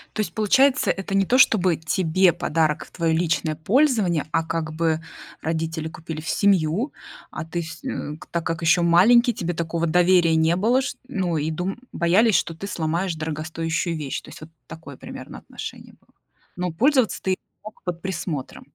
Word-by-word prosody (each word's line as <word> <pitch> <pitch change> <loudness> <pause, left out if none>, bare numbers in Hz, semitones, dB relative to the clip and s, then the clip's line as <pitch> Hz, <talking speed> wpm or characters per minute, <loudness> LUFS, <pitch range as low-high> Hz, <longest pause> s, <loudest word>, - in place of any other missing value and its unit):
То 215 - 0
есть - - -4
получается, 255 +6 +3
это 195 0 -3
не 195 - +3
то, 250 +6 +3
чтобы 185 -9 +4
тебе 170 +2 +2
подарок 155 0 0
в - - -20
твоё 165 -2 0
личное 160 -2 0
пользование, 200 - +2
а 165 - +1
как 160 -1 -3
бы 160 0 0 0.4
родители 160 0 -2
купили 160 -1 -7
в 155 - -6
семью, 200 - +2 0.4
а 155 - -5
ты 170 +1 -3
вс 170 0 -9
м, 150 +1 -5
так 170 -1 -2
как 165 +1 -2
ещё 170 +1 +4
маленький, 235 +9 +5
тебе 175 -4 -3
такого 170 0 -2
доверия 175 -1 +4
не 160 +1 +3
было 235 +8 +2
шт 275 0 -4
ну 185 - -1
и 155 +2 -1
дум 180 +4 -3
боялись, 190 +6 +3
что 165 - +1
ты 200 +5 -7
сломаешь 170 0 -1
дорогостоящую 160 +2 -3
вещь. 145 -3 -4
То - - -14
есть - - -12
вот 155 - -10 0.2
такое 160 -5 -10
примерно - - -9
отношение - - -9
было. - - -28 0.4
Но 180 -1 -2
пользоваться 255 - +2
ты 190 -1 0 0.3
мог 215 +1 -12
под 175 -1 -4
присмотром. 170 -7 -5
170 Hz, 180 wpm, -23 LUFS, 160-195 Hz, 0.4 s, маленький